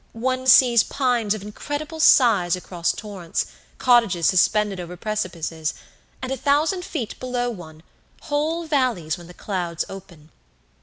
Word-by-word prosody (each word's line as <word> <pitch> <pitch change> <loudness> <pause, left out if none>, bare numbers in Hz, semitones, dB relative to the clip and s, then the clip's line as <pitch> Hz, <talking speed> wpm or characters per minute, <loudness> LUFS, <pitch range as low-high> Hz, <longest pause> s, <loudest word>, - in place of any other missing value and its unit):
One 255 +2 -2
sees 245 -2 +7
pines 245 -6 0
of 205 - -8
incredible 290 +9 -6
size 215 - +5
across 175 -1 -2
torrents, 195 -6 -4 0.3
cottages 230 -9 +3
suspended 200 +1 +2
over 175 0 -7
precipices, 170 -6 -3 0.5
and, 260 - -4
a 270 - -1
thousand 305 - +1
feet 255 -12 -5
below 245 -1 -2
one, 160 -6 -11 0.4
whole 315 +3 -1
valleys 250 - 0
when 170 - -12
the 180 - -13
clouds 175 -5 -3
open. 170 -5 -12
215 Hz, 135 wpm, -22 LUFS, 175-260 Hz, 0.5 s, sees